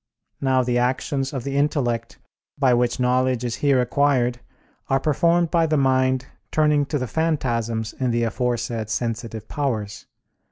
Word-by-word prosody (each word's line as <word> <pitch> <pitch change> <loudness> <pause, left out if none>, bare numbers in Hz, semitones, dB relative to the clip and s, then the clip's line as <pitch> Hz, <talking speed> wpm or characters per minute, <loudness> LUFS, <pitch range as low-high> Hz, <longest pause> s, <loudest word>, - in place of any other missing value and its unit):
Now 130 -1 +2
the 120 0 +1
actions 135 +2 -1
of 130 -4 -4
the 140 +1 -4
intellect, 125 -5 0 0.4
by 135 -3 +3
which 120 +1 +1
knowledge 125 0 +1
is 120 -1 -3
here 140 -3 +3
acquired, 125 -1 +1 0.5
are 135 - +2
performed 170 +4 +2
by 165 -1 +3
the 155 -1 +1
mind 130 -1 +2 0.2
turning 150 -2 +2
to 150 - -1
the 130 - -2
phantasms 115 -7 -1
in 130 -1 -2
the 120 0 +1
aforesaid 115 -2 -2
sensitive 115 -1 -3
powers. 110 -8 -3
130 Hz, 150 wpm, -23 LUFS, 120-140 Hz, 0.5 s, by